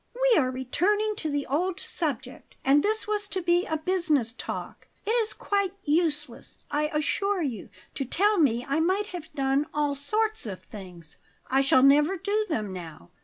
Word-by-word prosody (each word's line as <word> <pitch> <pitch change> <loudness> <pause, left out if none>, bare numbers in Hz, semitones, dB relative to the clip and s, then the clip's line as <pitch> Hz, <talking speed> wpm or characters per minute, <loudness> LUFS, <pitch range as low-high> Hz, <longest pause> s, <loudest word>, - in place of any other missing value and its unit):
"We - - +5
are 255 -3 +1
returning 400 - 0
to 315 - -2
the 285 -1 -1
old 350 +7 -1
subject; 265 -9 -4
and 280 +2 +5
this 430 +3 -1
was 415 -1 -1
to 385 - -3
be 345 +1 +2
a 315 - -1
business 310 -8 +1
talk. - - -7 0.2
It 435 - 0
is 455 -2 +2
quite 400 -2 -1
useless, 300 -1 -1
I 300 +1 +1
assure 365 +5 0
you, 235 -6 -4 0.2
to 275 - -3
tell 400 - +2
me 245 -5 +2
I 280 +3 +1
might 375 +5 +1
have 335 -2 -7
done 275 +1 +1
all 295 -1 +1
sorts 430 - -1
of 190 -3 -7
things. 180 -6 -11 0.3
I 270 +1 +4
shall 265 -1 +4
never 295 +7 +5
do 415 +4 -1
them 215 - -2
now. 160 - -9
300 Hz, 175 wpm, -27 LUFS, 270-390 Hz, 0.3 s, We